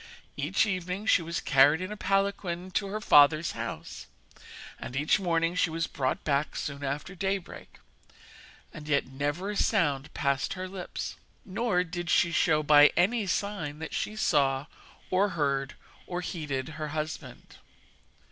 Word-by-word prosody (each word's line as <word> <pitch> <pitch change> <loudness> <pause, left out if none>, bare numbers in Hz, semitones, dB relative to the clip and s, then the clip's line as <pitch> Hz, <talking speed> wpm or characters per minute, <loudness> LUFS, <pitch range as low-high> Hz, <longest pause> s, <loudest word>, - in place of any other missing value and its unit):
Each 150 +10 +1
evening 185 0 -3
she 200 - +4
was 170 +1 -3
carried 145 +2 +5
in 185 +2 -5
a - - -4
palanquin 195 -2 -1
to 200 +2 -1
her 210 +2 -3
father's 155 -4 +5
house, - - -6 0.7
and 125 - -7
each 150 +8 +2
morning 165 -2 +1
she 180 -1 +1
was 165 0 -1
brought 130 -2 -2
back 145 0 0
soon 140 0 -4
after 140 +6 -3
daybreak; 190 0 -4 1.0
and 150 -1 -9
yet 145 -2 +2
never 145 +9 -3
a - - -5
sound 145 -6 +1
passed 140 -1 0
her 185 0 -5
lips, 185 -1 -6 0.3
nor 195 -2 0
did 175 0 -5
she 170 - +3
show 155 -2 +2
by 150 0 +8
any 205 +4 +2
sign 185 -6 -2
that 160 - -7
she 215 - -2
saw, 140 -9 +2 0.5
or 195 +2 +3
heard, 140 -2 0 0.3
or 180 0 -3
heeded 150 -6 -4
her 155 0 -5
husband. 155 +1 -6
165 Hz, 150 wpm, -28 LUFS, 145-185 Hz, 1.0 s, by